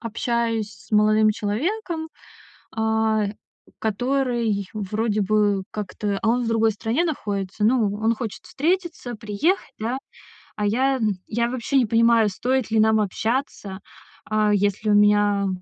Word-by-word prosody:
общаюсь 230 Hz, -1 st, -1 dB
с 215 Hz, +1 st, -19 dB
молодым 215 Hz, +1 st, +4 dB
человеком, 320 Hz, -, -2 dB, 0.7 s
а, 220 Hz, -1 st, +1 dB, 0.5 s
который 235 Hz, -2 st, 0 dB
вроде 215 Hz, +1 st, -1 dB
бы 205 Hz, -1 st, +1 dB
как-то, 205 Hz, -1 st, -3 dB
а, 225 Hz, -, +1 dB
он 245 Hz, +1 st, +2 dB
в 230 Hz, -, -2 dB
другой 225 Hz, -1 st, +3 dB
стране 230 Hz, +10 st, -1 dB
находится. 205 Hz, -, -3 dB
Ну, 220 Hz, -3 st, +3 dB
он 220 Hz, +2 st, +1 dB
хочет 220 Hz, -2 st, -6 dB
встретиться, 320 Hz, +1 st, -2 dB
приехать, 235 Hz, -, -1 dB
да. 235 Hz, +4 st, -2 dB, 0.6 s
А 210 Hz, -, -2 dB
я, 265 Hz, +5 st, +2 dB
м, 215 Hz, -4 st, +1 dB
я 235 Hz, +2 st, 0 dB
вообще 255 Hz, +2 st, -1 dB
не 255 Hz, -, +4 dB
понимаю, 230 Hz, -1 st, +4 dB
стоит 255 Hz, +4 st, -1 dB
ли 220 Hz, -, +3 dB
нам 220 Hz, 0 st, +4 dB
общаться, 210 Hz, -1 st, -2 dB, 0.5 s
а, 215 Hz, -1 st, +2 dB
если 205 Hz, +1 st, 0 dB
у -, -, +4 dB
меня 205 Hz, -1 st, +4 dB
220 Hz, 140 wpm, -23 LUFS, 210-240 Hz, 0.7 s, молодым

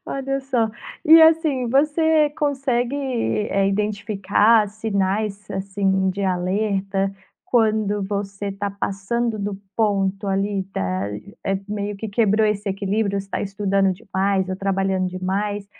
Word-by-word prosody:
Olha 275 Hz, 0 st, -2 dB
só. 250 Hz, -5 st, 0 dB, 0.4 s
E, 320 Hz, +1 st, +9 dB
assim, 315 Hz, -6 st, +3 dB, 0.7 s
consegue, 270 Hz, -3 st, 0 dB
eh, 225 Hz, -7 st, 0 dB
identificar 210 Hz, +1 st, +2 dB
sinais, 205 Hz, -1 st, -2 dB
assim, 190 Hz, -1 st, 0 dB
de 200 Hz, +2 st, -4 dB
alerta 195 Hz, +1 st, 0 dB, 0.3 s
quando 215 Hz, -3 st, +1 dB
você 200 Hz, 0 st, -4 dB
tá 200 Hz, +1 st, -3 dB
passando 215 Hz, +4 st, -2 dB
do 200 Hz, -1 st, -3 dB, 0.2 s
ponto 200 Hz, -2 st, 0 dB
ali, 195 Hz, 0 st, 0 dB
tá 95 Hz, +1 st, -2 dB, 0.4 s
eh, 195 Hz, 0 st, 0 dB
meio 205 Hz, -1 st, -3 dB
que 220 Hz, +2 st, -5 dB
quebrou 215 Hz, 0 st, +2 dB
esse 210 Hz, -1 st, -1 dB
equilíbrio, 200 Hz, +1 st, -1 dB
você 195 Hz, -, -12 dB
tá -, -, -3 dB
estudando 195 Hz, -1 st, +1 dB
demais 190 Hz, -1 st, -1 dB
ou 185 Hz, -, -2 dB
trabalhando 195 Hz, -1 st, 0 dB
demais? 195 Hz, +3 st, -2 dB
200 Hz, 120 wpm, -22 LUFS, 195-220 Hz, 0.7 s, E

